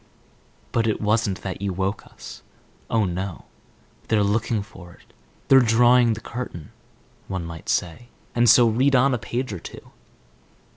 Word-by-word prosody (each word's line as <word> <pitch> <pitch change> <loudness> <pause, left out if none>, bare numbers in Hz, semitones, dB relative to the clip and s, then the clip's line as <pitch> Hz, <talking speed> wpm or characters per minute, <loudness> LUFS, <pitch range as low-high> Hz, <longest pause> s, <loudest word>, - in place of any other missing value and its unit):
But 115 -1 +1
it 110 - 0
wasn't 105 -2 0
that 95 -1 -5
you 100 -2 -2
woke 95 +2 -3
us. - - -12 0.5
Oh, 110 -2 +2
no. 90 -1 -5 0.6
"They're 110 -2 +2
looking 105 +1 0
for 95 -4 -14
it; - - -24 0.3
they're 135 - +7
drawing 120 0 +4
the 110 - -7
curtain, 115 -7 -7 0.6
one 95 -3 -4
might 80 -1 -9
say, 90 +8 -2 0.3
and 120 -1 +3
so 120 +1 +7
read 130 +5 +2
on 130 +2 +4
a 120 - -1
page 120 0 -4
or 90 - -5
two. - - -12
110 Hz, 155 wpm, -23 LUFS, 95-120 Hz, 0.6 s, they're